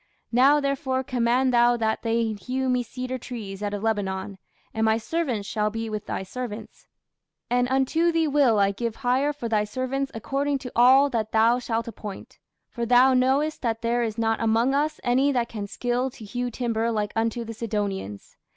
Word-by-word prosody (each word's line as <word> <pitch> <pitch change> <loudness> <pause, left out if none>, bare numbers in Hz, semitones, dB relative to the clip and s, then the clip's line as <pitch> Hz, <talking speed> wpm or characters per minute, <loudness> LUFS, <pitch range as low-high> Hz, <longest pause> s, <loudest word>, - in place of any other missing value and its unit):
Now 270 +5 +5
therefore 270 -2 -1
command 250 0 +1
thou 240 0 +4
that 220 -1 -1
they 230 -1 0
hew 260 +5 -3
me 250 0 +2
cedar 255 +2 -5
trees 210 -6 -7
out 205 -1 -2
of 205 - -6
Lebanon; 195 -3 -2 0.3
and 220 - -1
my 220 0 +3
servants 240 -5 -2
shall 215 -1 0
be 225 +1 -4
with 215 -1 -5
thy - - -3
servants: 230 +2 -7 0.6
and 245 0 +2
unto 270 +6 +2
thee 330 -1 +1
will 275 -6 +3
I 200 -1 +3
give 230 +2 -3
hire 265 +4 +2
for 285 -5 -5
thy 215 -2 +1
servants 260 +5 -3
according 275 +5 -1
to 255 -2 -8
all 265 +4 +6
that 220 -2 -2
thou 230 +2 +4
shalt 230 -2 -2
appoint: 210 -3 -9 0.3
for 235 - -5
thou 250 +3 +5
knowest 270 +5 +1
that 230 -2 -2
there 235 +1 +1
is 225 -2 -2
not 225 0 0
among 230 +4 +2
us 295 +2 0
any 260 +4 +3
that 240 -2 0
can 205 -3 -5
skill 245 +4 -1
to 240 -4 -12
hew 245 +4 -3
timber 230 -1 -1
like 210 -2 -2
unto 230 +1 -1
the 225 - -6
Sidonians. 205 - -4
235 Hz, 190 wpm, -25 LUFS, 220-260 Hz, 0.6 s, all